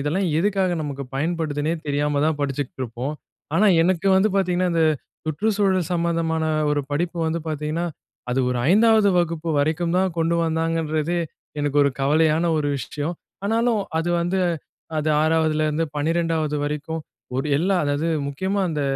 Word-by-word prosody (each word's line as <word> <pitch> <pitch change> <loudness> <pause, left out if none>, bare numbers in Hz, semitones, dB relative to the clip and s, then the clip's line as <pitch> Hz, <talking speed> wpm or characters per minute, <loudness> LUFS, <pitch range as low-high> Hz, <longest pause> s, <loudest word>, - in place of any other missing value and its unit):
இதெல்லாம் 170 +6 0
எதுக்காக 190 -1 +1
நமக்கு 140 -2 -4
பயன்படுதுனே 155 0 -1
தெரியாம 145 0 0
தான் 155 -2 0
படிச்சுக்கிட்ருப்போம். 135 -1 -3 0.4
ஆனா 210 +5 +4 0.2
எனக்கு 185 +2 +1
வந்து 195 +3 +4
பாத்தீங்கன்னா, 180 -1 +1
இந்த 165 -1 +3 0.4
சுற்றுச்சூழல் 190 +2 +1
சம்மந்தமான 165 -1 0 0.3
ஒரு 145 - +1
படிப்பு 170 +3 -1
வந்து 165 +1 -1
பாத்தீங்கன்னா, 155 +3 -2 0.4
அது 130 +2 +1
ஒரு 125 - -1
5வது 220 0 +5
வகுப்பு 165 -1 -1
வரைக்கும் 160 +4 0
தான் 185 -2 +1
கொண்டு 165 +1 +2
வந்தாங்கன்றதே, 165 0 0 0.4
எனக்கு 145 0 -1
ஒரு 140 - +3
கவலையான 155 +3 +3
ஒரு 145 -1 0
விஷயம். 145 +6 -4 0.3
ஆனாலும் 225 0 +1 0.2
அது 165 - -1
வந்து, 180 +2 0 0.6
அது 155 - 0
6வதுலருந்து 155 0 +1
12வது 160 -1 0
வரைக்கும் 150 +2 -3 0.4
ஒரு 135 +3 -1
எல்லாம், 185 +3 +2
அதாவது 145 +3 0 0.2
முக்கியமா 190 +8 -1
அந்த 150 -2 -1
160 Hz, 135 wpm, -23 LUFS, 150-175 Hz, 0.6 s, 5வது